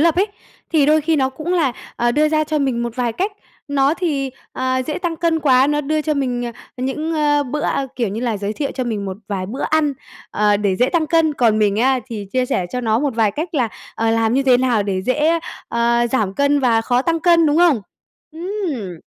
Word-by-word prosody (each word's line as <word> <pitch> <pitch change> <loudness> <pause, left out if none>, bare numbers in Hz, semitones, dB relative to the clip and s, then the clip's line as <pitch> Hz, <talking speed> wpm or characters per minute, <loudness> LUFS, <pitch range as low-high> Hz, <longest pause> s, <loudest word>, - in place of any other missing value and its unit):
lập 335 +1 +3
ấy, 385 +3 +3 0.5
thì 295 -3 +4
đôi 310 +1 +4
khi 315 +1 +1
nó 265 -2 +2
cũng 305 +6 -4
là, 315 -8 +2 0.2
ờ, 240 0 +1
đưa 305 +2 +3
ra 310 0 +1
cho 305 0 -1
mình 260 -4 0
một 235 +1 -4
vài 240 -2 0
cách. 390 - -2 0.4
Nó 280 +1 +2
thì, 290 -7 -1 0.2
ờ, 260 0 -1
dễ 305 - -2
tăng 345 -2 -2
cân 325 -1 +1
quá, 265 -3 +4
nó 295 +1 +1
đưa 305 +2 -1
cho 305 0 0
mình, 250 -3 -1
ờ, 240 - -4 0.2
những, 285 +6 -2
a, 295 -1 +2
bữa, 290 +2 -4
a 275 -2 -1
kiểu 235 -5 0
như 210 +4 -4
là, 235 -4 -1
giới 200 +1 -3
thiệu 275 +5 -3
cho 255 - -2
mình 215 -4 -3
một 190 -1 -5
vài 190 -3 -3
bữa 255 +7 -5
ăn, 310 -2 +1 0.4
ờ, 210 0 +2
để 200 -2 0
dễ 250 +4 +2
tăng 335 -3 +1
cân, 320 0 +2
còn 225 -4 +3
mình 205 -1 +2
á 260 +3 +3
thì 215 -5 -6
chia 255 -1 +1
sẻ 180 - -1
cho 250 - -1
nó 225 -2 +1
một 280 -3 -1
vài 220 -2 +2
cách 320 - -5
là, 250 -6 +1 0.3
ờ, 225 0 0
làm 225 +1 +2
như 275 - +2
thế 260 -2 +5
nào 245 -4 +1
để 190 -2 -2
dễ, 300 - +2 0.3
ờ, 235 0 +2
giảm 205 -6 0
cân 280 0 +2
và 235 -3 +3
khó 245 +2 +1
tăng 330 +2 0
cân, 335 -1 +4
đúng 295 - +2
không? 335 -8 +4 0.5
Ừm, 320 - -4
265 Hz, 240 wpm, -19 LUFS, 230-310 Hz, 0.5 s, thế